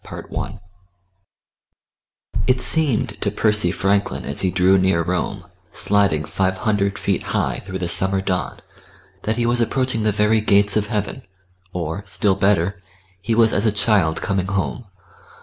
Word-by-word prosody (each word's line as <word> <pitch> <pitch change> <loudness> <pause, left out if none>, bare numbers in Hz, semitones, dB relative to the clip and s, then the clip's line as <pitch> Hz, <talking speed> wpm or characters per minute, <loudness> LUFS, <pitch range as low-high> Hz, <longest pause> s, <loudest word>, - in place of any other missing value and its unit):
CHAPTER - - -9
II - - -1
I - - -6 1.9
It 125 0 +3
seemed 145 -5 +1
to 100 - +1
Percy 105 -2 +2
Franklin 100 +2 0
as 70 - +1
he 95 - +1
drew 95 +1 +3
near 95 -3 +2
Rome, 90 +2 -2 0.3
sliding 100 -7 +1
five 95 +1 -1
hundred 100 -1 0
feet - - -1
high - - -1
through 95 -1 -6
the 90 -2 -3
summer 95 +2 0
dawn, 95 -1 -3 0.6
that 110 +2 0
he 120 - +1
was 120 0 +1
approaching 125 -1 0
the 110 0 +2
very 105 +2 +2
gates 100 -1 +3
of 105 -1 +1
heaven, 105 +4 -3 0.5
or, 85 +2 -4
still 100 +1 +1
better, 95 0 +1 0.4
he 115 +4 -1
was 115 -1 +4
as 105 +3 +1
a - - +3
child 100 -6 +1
coming 95 -2 -1
home. 100 +5 -2
100 Hz, 160 wpm, -21 LUFS, 95-110 Hz, 1.9 s, was